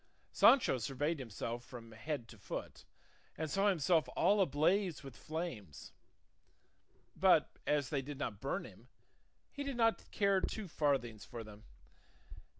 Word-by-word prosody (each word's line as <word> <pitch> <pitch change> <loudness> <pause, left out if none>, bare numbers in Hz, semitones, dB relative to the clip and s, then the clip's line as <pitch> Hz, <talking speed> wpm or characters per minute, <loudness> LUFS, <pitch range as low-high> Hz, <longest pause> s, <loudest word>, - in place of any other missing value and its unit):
Sancho 240 - +5
surveyed 140 +7 -1
himself 120 0 -5
from 120 -3 -10
head 120 +2 -4
to 110 - -13
foot - - -7 0.5
and 155 -1 -3
saw 195 +1 +3
himself 165 -2 +2
all 205 0 +4
ablaze 175 +2 +2
with 135 -2 -9
flames; 125 - -6 1.2
but - - +3
as 145 -3 +1
they 145 -3 0
did 140 +1 -7
not 115 -7 -4
burn 140 +8 -2
him, - - -14 0.6
he 285 - -5
did 275 -3 -4
not 225 -1 +2
care 200 -2 +2
two 215 0 -3
farthings 135 -9 0
for 115 -2 -7
them. 105 0 -13
145 Hz, 140 wpm, -35 LUFS, 120-185 Hz, 1.2 s, Sancho